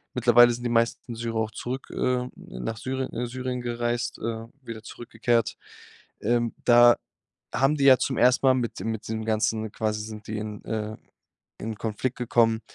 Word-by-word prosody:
Mittlerweile 120 0 +6
sind 120 +1 -6
die - - +1
meisten 115 +1 0
Syrer 115 0 -3
auch 110 0 0
zurück, 125 +5 -5
äh, 125 0 0
nach 60 - -6
Syrie 130 +3 -2
äh, 120 +1 -2
Syrien 125 0 -4
gereist, 120 0 -2
äh, 115 0 -4 0.2
wieder 115 -3 -7
zurückgekehrt. 115 0 -1 0.7
Ähm, 120 +1 +1
da 120 0 +7 0.6
haben 135 +5 +3
die 140 - +1
ja 135 -1 +9
zum 130 - -1
ersten 125 +2 +4
Mal 130 - +6
mit 120 -3 -2
dem 115 - -2
mit 110 - -6
den 110 0 -3
ganzen 110 0 0
quasi 110 -1 -1
sind 110 0 -8
die 110 - -3
in, 105 -1 -6
äh 110 -1 -3 0.6
in 110 0 -4
Konflikt 115 +4 -3
gekommen. 115 -2 +2
115 Hz, 175 wpm, -26 LUFS, 110-125 Hz, 0.7 s, ja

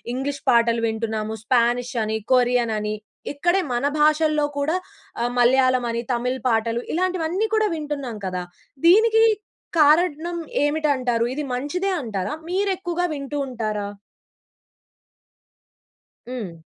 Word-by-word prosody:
English 280 +2 -3
పాటలు 235 -1 +3
వింటున్నాము, 220 -1 -3
'Spanish' 245 +2 +1
అని, 220 0 -1 0.2
'కొరియన్' 245 -2 +3
అని 210 0 -2 0.4
ఇక్కడే 350 +6 +2
మన 240 +3 0 0.2
భాషల్లో 305 0 +3
కూడా 300 +4 0 0.5
ఆహ్, 240 +1 0
'మలయాళం' 255 0 +4
అని 235 0 -2
'తమిళ' 250 +2 -2
పాటలు, 230 +1 0
ఇలాంటివన్నీ 365 +3 0
కూడా 435 -1 +2
వింటున్నాం 290 -7 -4
కదా! 180 -1 -3 0.4
దీనికి 445 +5 +6 0.6
కారణం 320 +2 +3 0.3
ఏమిటి 305 +1 +1
అంటారు? 245 -3 0
ఇది 300 +3 -3
మంచిదే 295 +10 -1
అంటారా? 210 -5 -3 0.2
మీరు 390 +3 0
ఎక్కువగా 350 -1 -2
వింటూ 285 0 -5
ఉంటారా? 215 -5 -3 2.4
హ్మ్. 190 -10 -6
255 Hz, 115 wpm, -23 LUFS, 235-315 Hz, 2.4 s, దీనికి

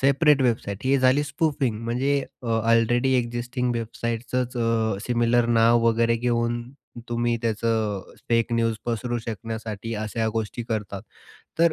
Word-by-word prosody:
Separate 140 +1 +4
website 110 -5 0
ही 135 +1 +3
झाली 130 +3 +4
spoofing. 140 -6 -1
म्हणजे 135 +4 +1 0.2
अ, - - -7
already 115 +3 +2
existing 120 +1 -2
वेबसाईटचंच 115 +2 -3
अ, 115 -2 +1
similar 120 0 +2
नाव 115 +1 +5
वगैरे 115 0 +2
घेऊन 120 0 0 0.5
तुम्ही 120 0 0
त्याचं 110 -3 -1 0.2
फेक 115 0 +2
न्यूज 115 -1 +1
पसरू 120 +1 -1
शकण्यासाठी 110 0 -5
अशा 110 +1 -1
गोष्टी 115 +2 -3
करतात. 105 -3 -3 0.6
तर 170 -1 +5
115 Hz, 130 wpm, -24 LUFS, 115-125 Hz, 0.6 s, नाव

